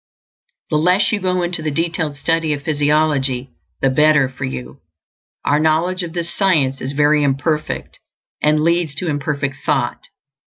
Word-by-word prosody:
The 155 - +3
less 180 +5 +3
you 215 - 0
go 185 -1 0
into 175 -1 -3
the 155 - -1
detailed 160 -1 -2
study 165 0 +1
of 145 -1 -5
physiology, 145 -4 +1 0.3
the 135 - +4
better 150 0 +4
for 130 - -6
you. 65 0 -6 0.7
Our 145 - +3
knowledge 165 +4 +1
of 170 -2 -5
this 170 -1 -4
science 150 -9 +1
is 135 +2 -4
very 150 +1 +3
imperfect, 145 +2 -1 0.4
and 150 0 +3
leads 170 -3 +1
to 170 +3 -2
imperfect 145 -1 -2
thought. 135 -5 -1
150 Hz, 155 wpm, -19 LUFS, 140-165 Hz, 0.7 s, the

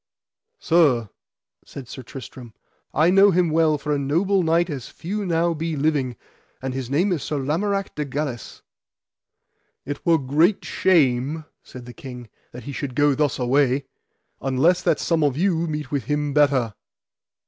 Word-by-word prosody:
Sir, 140 - +2 0.5
said 135 -3 -10
Sir 130 - -8
Tristram, 125 -2 -10 0.4
I 160 +4 +3
know 195 +2 +6
him 180 -3 +2
well 155 -1 +3
for 150 +1 -2
a 145 - 0
noble 175 +8 +1
knight 170 +1 +2
as 140 -8 -6
few 200 +4 -5
now 170 0 +1
be 165 0 -3
living, 140 -4 0 0.4
and 130 0 -4
his 130 -2 -4
name 175 +9 +1
is 170 -5 -1
Sir 150 - -3
Lamorak 195 +9 -1
de 150 - -3
Galis. 140 -4 -5 1.2
It 145 +1 -5
were 165 -1 +4
great 155 +8 +1
shame, 150 -3 +2 0.2
said 125 -1 -12
the 120 - -10
king, 125 -3 -10 0.2
that 125 0 -10
he 140 - -6
should 135 -2 -5
go 145 0 +4
thus 145 0 0
away, 135 +2 +1 0.6
unless 135 +7 +2
that - - +1
some 165 -2 +1
of 140 -2 +1
you 170 -2 +1
meet 150 -3 -4
with 140 -3 -2
him 145 -1 -1
better. 135 -6 +2
145 Hz, 160 wpm, -23 LUFS, 130-165 Hz, 1.2 s, know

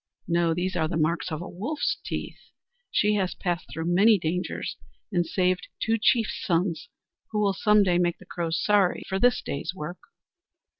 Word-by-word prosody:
No, 170 -1 +2
those 185 +2 -2
are 160 - +1
the 165 0 -2
marks 165 +3 0
of 155 +2 -3
a - - -7
wolf's 255 - -2
teeth! - - -5 0.5
She 210 0 +2
has 185 -2 -1
passed 175 -2 -2
through 160 +1 -4
many 210 +4 +6
dangers 175 +1 -3 0.4
and 175 -3 +1
saved 180 +1 0
two 225 0 +1
chief's 225 0 +2
sons, 170 -2 0 0.4
who 210 - -1
will 200 -2 +2
some 210 +1 +4
day 180 -2 +2
make 175 -1 +1
the - - -16
Crows 165 -2 -2
sorry 205 -3 +2
for 190 0 -1
this 245 +2 +3
day's 140 +6 -4
work!" 175 +1 -6
180 Hz, 180 wpm, -26 LUFS, 170-205 Hz, 0.5 s, many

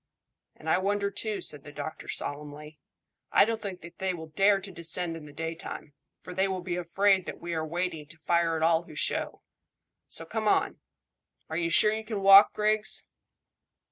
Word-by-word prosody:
"And 155 - -13
I 160 - +3
wonder 200 +1 0
too," 210 +1 -2
said 145 -2 -5
the 145 - -10
doctor 145 +2 -7
solemnly. 150 +1 -5 0.5
"I - - +6
don't 225 0 -2
think 190 -3 -6
that 170 +1 -13
they 190 -1 -1
will 160 -1 -9
dare 195 +5 +3
to 195 0 -9
descend 170 0 -1
in 160 -2 -9
the 145 - -11
daytime, 165 -1 -6 0.3
for 180 - -9
they 190 +2 +1
will 185 -2 -3
be 175 -1 -3
afraid 190 +2 +2
that - - -6
we 170 0 -5
are 160 -1 -1
waiting 165 -1 -3
to 160 - -13
fire 165 +1 +1
at 160 - -2
all 165 0 +4
who 165 -3 -14
show; - - -2 0.6
so - - -4
come - - -3
on. - - +2 0.7
Are 160 - -2
you 165 -1 0
sure 210 +5 +6
you 220 0 -3
can 215 -3 -4
walk, 195 +1 +9
Griggs?" 215 0 +1
175 Hz, 195 wpm, -28 LUFS, 160-195 Hz, 0.7 s, walk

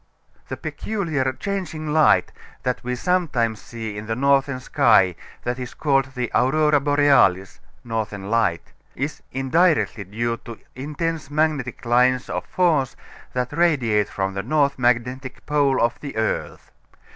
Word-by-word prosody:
The - - -5
peculiar 160 -11 -2
changing 160 -4 -4
light 155 -1 +4 0.3
that 125 -1 -2
we 125 +1 -2
sometimes 125 - 0
see 110 -3 -7
in 105 +1 -7
the 110 - -1
northern 140 0 +2
sky, 110 - +4 0.3
that 120 +1 -2
is 125 -1 -7
called 135 -3 +1
the 125 -1 -2
Aurora 150 +3 +3
Borealis 140 -10 +3 0.2
(Northern 105 -3 -4
Light), 115 -8 0 0.2
is 140 +4 -4
indirectly 135 - +1
due 115 +4 -2
to 115 -1 -10 0.2
intense 150 +3 -4
magnetic 145 -5 -1
lines 125 +2 +2
of - - -4
force 160 -8 +1 0.4
that 125 -1 -2
radiate 130 -12 +2
from 95 -1 -2
the 100 - -2
north 140 +4 +1
magnetic 125 +2 -1
pole 145 -3 +2
of 120 0 +1
the 140 -6 -7
earth. 110 0 -3
130 Hz, 135 wpm, -22 LUFS, 115-150 Hz, 0.4 s, light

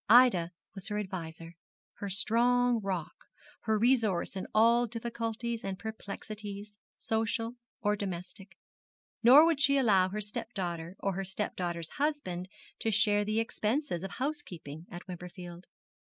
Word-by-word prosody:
Ida 230 -8 +7 0.2
was 195 -2 -7
her 210 -1 -2
adviser, 170 -4 -5 0.4
her 200 - -4
strong 235 +5 +3
rock, 185 -5 -3 0.5
her 220 -1 +3
resource 225 -6 +2
in 190 - -4
all 235 +2 +5
difficulties 230 0 -3
and 195 -1 -3
perplexities, 210 -1 -7 0.2
social 225 +1 -1 0.3
or 210 0 +3
domestic. 195 0 -6 0.6
Nor 265 +7 +9
would 330 -4 +2
she 280 0 +6
allow 195 -8 +4
her 210 +3 -3
stepdaughter 180 -4 -4
or 195 - 0
her 195 +2 -2
stepdaughter's 175 -4 -3
husband 190 - -1 0.3
to 225 - 0
share 205 -1 +4
the 215 +2 0
expenses 225 - -1
of 195 - -4
housekeeping 175 - -5
at 175 +1 -8
Wimperfield. 180 0 -8
210 Hz, 130 wpm, -31 LUFS, 185-230 Hz, 0.6 s, Nor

